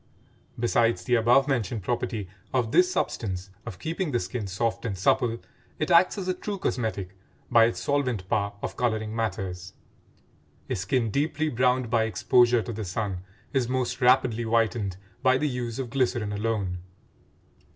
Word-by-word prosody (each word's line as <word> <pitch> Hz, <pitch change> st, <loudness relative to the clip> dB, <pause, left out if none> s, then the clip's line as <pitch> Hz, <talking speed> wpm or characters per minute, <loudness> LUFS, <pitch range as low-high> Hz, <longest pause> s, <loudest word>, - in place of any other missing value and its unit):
Besides 115 Hz, -5 st, +2 dB
the 125 Hz, -, -1 dB
above 120 Hz, +4 st, +4 dB
mentioned 115 Hz, -6 st, -1 dB
property 115 Hz, -2 st, -2 dB, 0.3 s
of 120 Hz, -3 st, +1 dB
this 365 Hz, 0 st, +4 dB
substance 95 Hz, -, -2 dB, 0.2 s
of 100 Hz, -6 st, -6 dB
keeping 165 Hz, -, -3 dB
the 120 Hz, -, +1 dB
skin 105 Hz, +3 st, -4 dB
soft 110 Hz, +5 st, -1 dB
and 105 Hz, -5 st, -3 dB
supple, 115 Hz, +5 st, +2 dB, 0.4 s
it 155 Hz, +3 st, -1 dB
acts 175 Hz, +4 st, +5 dB
as 190 Hz, -2 st, -4 dB
a 185 Hz, -, +2 dB
true 200 Hz, +2 st, -5 dB
cosmetic 110 Hz, -, -2 dB, 0.4 s
by 115 Hz, -1 st, +7 dB
its 115 Hz, -, -1 dB
solvent 125 Hz, -9 st, 0 dB
power 100 Hz, -1 st, 0 dB
of -, -, -3 dB
coloring 110 Hz, -2 st, -1 dB
matters: 95 Hz, -4 st, -3 dB, 1.0 s
a -, -, +1 dB
skin 110 Hz, +5 st, 0 dB
deeply 155 Hz, +3 st, 0 dB
browned 125 Hz, -1 st, +1 dB
by 115 Hz, -2 st, +3 dB
exposure 120 Hz, +3 st, +3 dB
to 120 Hz, -, -5 dB
the 110 Hz, +1 st, -4 dB
sun 95 Hz, 0 st, -3 dB, 0.3 s
is 130 Hz, -3 st, +1 dB
most 130 Hz, +1 st, -1 dB
rapidly 125 Hz, -2 st, +4 dB
whitened 110 Hz, -4 st, 0 dB, 0.2 s
by 130 Hz, 0 st, +4 dB
the 150 Hz, -, 0 dB
use 125 Hz, -4 st, -3 dB
of 130 Hz, -3 st, -4 dB
glycerin 120 Hz, -5 st, 0 dB
alone. 100 Hz, -4 st, -1 dB
115 Hz, 160 wpm, -26 LUFS, 105-130 Hz, 1.0 s, by